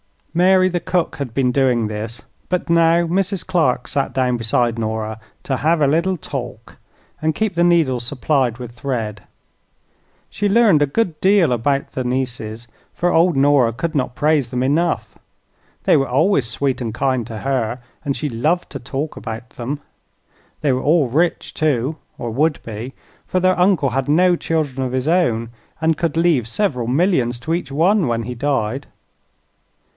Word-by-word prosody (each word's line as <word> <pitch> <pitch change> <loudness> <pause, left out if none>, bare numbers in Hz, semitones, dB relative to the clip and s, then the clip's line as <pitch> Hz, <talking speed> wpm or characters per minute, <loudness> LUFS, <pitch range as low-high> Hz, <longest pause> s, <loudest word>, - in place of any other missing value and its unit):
Mary 185 +2 +4
the 175 -1 -1
cook 180 0 -1
had 140 -5 -4
been 130 -1 +2
doing 125 -4 +2
this, 110 +2 -6 0.3
but 180 -2 -1
now 170 0 +4
Mrs. 190 +2 -1
Clark 160 -10 +1
sat 140 0 -1
down 130 -2 +1
beside 115 0 0
Nora 110 0 -3 0.2
to 135 - -1
"hev 160 +3 +1
a - - +5
little 170 +6 +2
talk" 125 -6 -7 0.4
and 155 0 0
keep 220 -3 0
the 170 0 +2
needles 145 -9 +2
supplied 130 -1 0
with 120 -2 -8
thread. 115 -4 -4 1.1
She 205 - -1
learned 205 -7 +5
a 145 - +3
good 170 0 -1
deal 190 -6 +4
about 135 +4 0
the 130 - -3
nieces, 120 -3 -3 0.3
for 175 0 +1
old 170 0 +3
Nora 135 -4 +4
could 155 +7 -3
not 125 -3 -1
praise 150 -4 +2
them 125 0 -1
enough. 160 +6 0 0.6
They - - +4
were 135 - 0
always 140 - +2
sweet 130 +3 -1
and 115 -3 -3
kind 130 -2 0
to 110 -3 -6
her 130 -2 -1 0.3
and 140 -1 -1
she 150 - -3
loved 155 +9 0
to - - -6
talk 140 +4 -4
about 115 +1 -7
them. 135 +5 -5 0.8
They 145 -2 +2
were 130 0 0
all 150 -3 +3
rich, 165 +7 0
too, 150 -1 0 0.2
or 120 -2 -4
would 150 +6 0
be; 115 +4 -7 0.3
for 185 - 0
their 185 0 +2
uncle 180 -6 +3
had 135 +2 -1
no 175 +4 +4
children 150 -6 -2
of 130 -1 -3
his 130 +3 0
own 120 -11 +1 0.3
and 160 -1 +2
could 165 -1 -1
leave 165 -9 +2
several 125 - -1
millions 130 -4 +1
to 160 +7 -3
each 165 -5 -3
one 175 +4 +3
when 115 -1 -1
he 125 +3 -5
died. 130 0 -1
140 Hz, 170 wpm, -19 LUFS, 120-165 Hz, 1.1 s, a